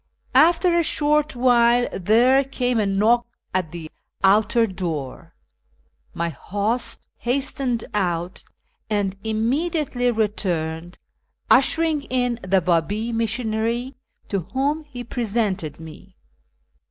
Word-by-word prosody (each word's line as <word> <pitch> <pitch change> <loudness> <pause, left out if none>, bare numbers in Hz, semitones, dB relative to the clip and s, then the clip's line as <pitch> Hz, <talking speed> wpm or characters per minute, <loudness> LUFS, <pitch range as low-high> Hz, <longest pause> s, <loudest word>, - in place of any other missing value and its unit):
After 340 +2 +4
a 340 - +4
short 300 -1 +1
M'hile 245 -1 +4 0.2
there 245 +7 +4
came 250 -3 -1
a 210 - +1
knock 225 +5 +2 0.3
at 180 -4 -1
the 165 -2 -8 0.3
outer 215 +4 +4
door; 170 - -5 0.8
my 170 0 -1
host 205 - -3 0.2
hastened 255 -1 -1
out 175 -3 -2 0.5
and 200 -3 0
immediately 245 +4 0
returned, 175 -7 -2 0.5
ushering 320 -2 +4
in 245 -2 -1
the 190 0 +2
Babi 195 +7 0
missionary, 230 +2 -1 0.4
to 200 - 0
M'hom 275 - -2
he 250 -4 -8
presented 210 - -2
me. 165 +4 -12
225 Hz, 105 wpm, -22 LUFS, 190-255 Hz, 0.8 s, After